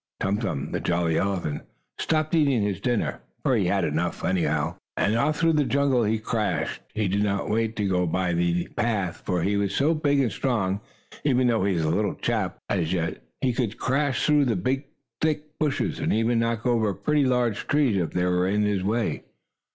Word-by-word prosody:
Tum 100 +2 0
Tum, 80 - -3
the - - -1
jolly 85 -2 0
elephant, 95 -7 -1 0.4
stopped 155 0 0
eating 140 -9 +3
his 100 -2 -2
dinner, 120 -3 0 0.2
for - - +3
he - - +2
had - - +1
had - - -1
enough, - - -2
anyhow, 80 -2 0 0.2
and 105 - +2
off 150 +6 +1
through 165 0 +3
the 150 -1 +3
jungle 135 -4 +2
he 110 +2 +1
crashed. 110 -1 -2
He 105 -2 +1
did 100 +2 0
not 100 -1 0
wait 115 0 0
to 105 -3 0
go 90 -2 +1
by 90 +1 0
the 85 0 +1
path, 100 -6 -1
for 90 -3 -1
he 100 +2 +1
was 100 -1 0
so 150 +4 +3
big 145 -3 +1
and 125 -5 +2
strong. 100 -4 -1 0.4
Even 130 -3 +3
though 115 -5 +2
he 100 -2 +1
was 80 - 0
a 80 - +1
little 100 +3 0
chap, 110 -6 -1
as 85 -4 0
yet, 85 -2 -2 0.2
he 125 -2 +1
could 115 -3 -2
crash 135 +1 0
through 150 -1 +4
big 130 +9 -1 0.4
thick 155 -1 -2
bushes, 150 -3 0
and - - 0
even 115 +2 +2
knock 115 -1 -1
over 110 -5 +2
pretty 150 +6 +1
large 120 -4 0
trees, 145 -7 +2
if 85 -4 0
they 90 0 0
were 90 0 +2
in 105 +2 +1
his 100 -2 0
way. 110 +3 0
110 Hz, 205 wpm, -25 LUFS, 95-130 Hz, 0.4 s, through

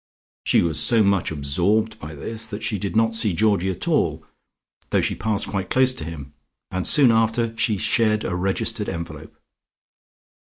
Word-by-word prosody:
She - - +3
was 80 -3 0
so 115 -2 +4
much 100 -3 +1
absorbed 85 +9 -1
by 75 +1 -9
this 110 +9 -6
that 110 -1 -7
she 105 - -1
did 100 +3 -4
not 115 0 +2
see 110 -3 +2
Georgie 100 -2 +1
at 95 - -3
all, - - 0 0.6
though - - +1
she - - 0
passed 110 -2 0
quite 95 -2 -4
close 130 0 +4
to 80 - -3
him, 75 -4 -9 0.4
and 95 -1 -2
soon 135 -5 +6
after 115 0 +1
shed 110 0 +1
a - - -3
registered 95 +2 -1
envelope. 85 +1 -8
105 Hz, 165 wpm, -22 LUFS, 90-110 Hz, 0.6 s, soon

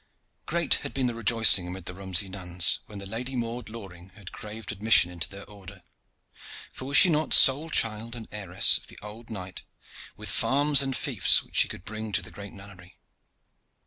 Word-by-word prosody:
Great 170 0 0
had 140 - -8
been 135 -1 -1
the 120 - -2
rejoicing 110 -4 +3
amid 90 0 -9
the 90 - -6
Romsey 95 +1 +1
nuns 90 -2 -1
when 105 - -12
the 100 - -9
Lady 120 +6 -6
Maude 120 -1 -6
Loring 95 -5 -12
had 105 -5 -13
craved 105 -1 -9
admission 105 -3 +2
into 85 -2 -3
their 100 +1 -11
order 100 -2 -14 0.9
for 130 - -8
was 140 +2 +3
she - - +8
not 155 -2 +2
sole 145 +5 +6
child 115 -3 -1
and 115 -2 -10
heiress 95 -4 +2
of - - -15
the - - -13
old 110 +3 -12
knight, 95 -4 -9 0.6
with - - -9
farms 145 +1 +2
and 135 -1 -2
fiefs - - +2
which - - -10
she - - +2
could 90 - -11
bring 110 0 -8
to - - -1
the - - -11
great 100 0 -11
nunnery? 95 -2 -15
105 Hz, 190 wpm, -25 LUFS, 95-120 Hz, 0.9 s, she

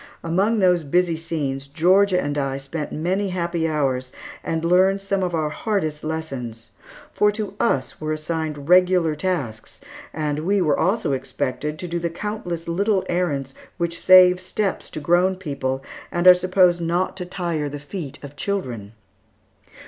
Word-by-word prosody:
Among 195 +7 +1
those 180 -4 +3
busy 170 +3 +1
scenes, 145 -5 -3
Georgia 180 +6 +3
and 145 -3 -2
I 135 -2 -1
spent 140 +3 -5
many 185 +6 -1
happy 170 -2 -1
hours, 135 -5 -1 0.3
and 165 0 -2
learned 185 +3 +4
some 195 0 -1
of 180 -2 -1
our 155 -2 -1
hardest 155 -7 -2
lessons; 135 -8 -5 0.4
for 210 0 +3
to 210 -2 -4
us 135 - 0
were 155 0 -2
assigned 155 -2 -3
regular 180 -2 +4
tasks, 150 -9 -3 0.3
and 150 -1 -2
we 195 +6 +1
were 165 -5 +2
also 185 -4 +1
expected 140 +3 -3
to 180 - -6
do 170 0 -2
the 170 0 -1
countless 175 -2 -5
little 195 +3 +1
errands 145 -7 -1 0.2
which 170 -1 -2
save 185 -1 +7
steps 195 +2 -2
to - - -6
grown 175 +5 +2
people, 140 -7 -3 0.3
and 175 +1 -1
are 180 - +11
supposed 180 -1 +3
not 170 +2 0
to 180 - -4
tire 170 -5 -2
the 145 - -6
feet 145 -1 -7
of 140 0 -9
children. 125 - -4
170 Hz, 155 wpm, -22 LUFS, 145-185 Hz, 0.4 s, are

